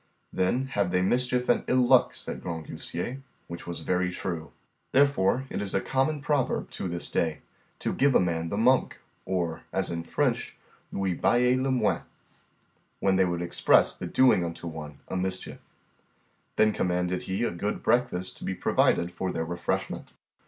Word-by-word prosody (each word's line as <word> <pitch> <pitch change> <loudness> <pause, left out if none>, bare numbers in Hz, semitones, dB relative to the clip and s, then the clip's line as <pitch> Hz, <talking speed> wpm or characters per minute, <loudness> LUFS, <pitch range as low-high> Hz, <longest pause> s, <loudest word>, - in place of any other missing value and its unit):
Then 95 +8 +1
have 100 -7 0
they 90 0 +1
mischief 125 +4 +1
and 120 - +3
ill 125 -1 +3
luck, - - +5
said - - -5
Grangousier; 85 - -5 0.2
which 85 0 -8
was 85 - -5
very 90 0 0
true. 85 -3 -4 0.4
Therefore 135 -3 +3
is 100 -2 -2
it - - +5
a - - 0
common 135 +3 +1
proverb 145 -2 0
to - - -4
this 85 0 -2
day, 80 -2 -1 0.4
to - - -2
give 140 -1 +3
a - - +7
man 85 -2 0
the 100 - -2
monk, 125 +4 +3 0.3
or, 90 -3 -2
as 95 -2 0
in 85 -1 -3
French, 85 - -1 0.4
lui 95 -2 -1
bailler 125 +7 +3
le 135 - 0
moine, 130 - +1 1.0
when 95 -1 +2
they 95 0 +4
would 85 -1 -2
express 85 - +3
the - - -6
doing 130 -9 +4
unto 85 0 -5
one 75 -3 -7
a - - -4
mischief. 95 0 -3 1.0
Then 110 0 +4
commanded 90 0 0
he 95 +4 0
a - - +1
good 100 +5 -3
breakfast 120 -7 +1
to - - -11
be 95 - -2
provided 85 -1 +2
for 95 +1 -3
their 80 -1 -2
refreshment. 85 0 -3
95 Hz, 170 wpm, -27 LUFS, 85-125 Hz, 1.0 s, a